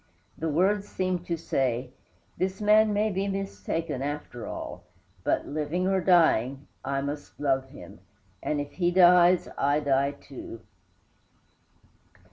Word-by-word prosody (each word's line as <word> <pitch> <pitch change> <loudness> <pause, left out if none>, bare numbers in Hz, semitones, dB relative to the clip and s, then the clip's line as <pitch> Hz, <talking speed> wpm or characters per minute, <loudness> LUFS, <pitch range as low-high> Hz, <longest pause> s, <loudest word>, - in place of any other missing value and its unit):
The 160 - -3
words 195 +6 +1
seemed 185 -1 -2
to 170 - -1
say, 130 -5 -1 0.4
"this 190 +1 -2
man 215 +1 +5
may 210 +1 +1
be 195 +1 -1
mistaken, 165 -7 -3
after 145 -4 -5
all; - - -6 0.4
but, - - 0
living 155 +5 -1
or 190 -1 +2
dying, 140 -7 +3 0.2
I 135 0 -1
must 145 +1 -6
love 135 -2 0
him, 140 - -12 0.4
and 150 - -1
if 145 0 -4
he 175 -2 0
dies, 180 0 +6
I 145 +2 +2
die 140 -1 +1
too." 135 -5 -10
160 Hz, 130 wpm, -27 LUFS, 140-185 Hz, 0.4 s, dies